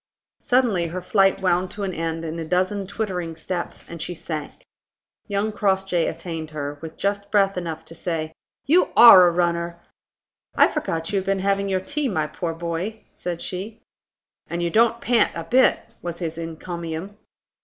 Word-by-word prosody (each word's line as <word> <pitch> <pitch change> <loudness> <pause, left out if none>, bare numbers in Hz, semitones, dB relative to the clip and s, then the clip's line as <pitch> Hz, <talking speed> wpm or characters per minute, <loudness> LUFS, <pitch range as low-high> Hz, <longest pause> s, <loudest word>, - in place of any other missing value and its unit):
Suddenly 235 -9 +2
her 180 +3 -5
flight 195 0 +3
wound 180 0 +2
to 205 +2 -6
an 190 -2 -2
end 165 0 -3
in 165 +1 -4
a - - -3
dozen 185 +4 0
twittering 185 -5 -3
steps, 170 +2 -5
and 170 -1 -8
she 175 +2 -4
sank. 155 -2 -6 0.6
Young 205 +1 0
Crossjay 190 -4 +1
attained 165 -3 -5
her, 145 -1 -5
with 160 -1 -8
just 200 0 -1
breath 195 -2 +3
enough 165 -3 -5
to 165 - -9
say: 160 -2 -3 0.3
"You 340 +7 +4
are 190 -7 +10
a - - +3
runner!" 170 0 0 0.8
"I - - +6
forgot 165 +2 -3
you 200 - +3
had 190 - -7
been 195 0 +2
having 200 +1 0
your 190 -1 0
tea, 290 +6 -2
my 160 -10 0
poor 165 +2 -4
boy," 170 +6 -4
said 175 -1 -5
she. 205 +5 -5 0.7
"And 170 +1 -3
you 170 - 0
don't 230 +2 +3
pant 240 -2 +2
a 165 - -4
bit!" 255 +10 +4 0.2
was 170 -1 -5
his 165 -2 -4
encomium. 170 +3 -6
180 Hz, 175 wpm, -23 LUFS, 165-200 Hz, 0.8 s, are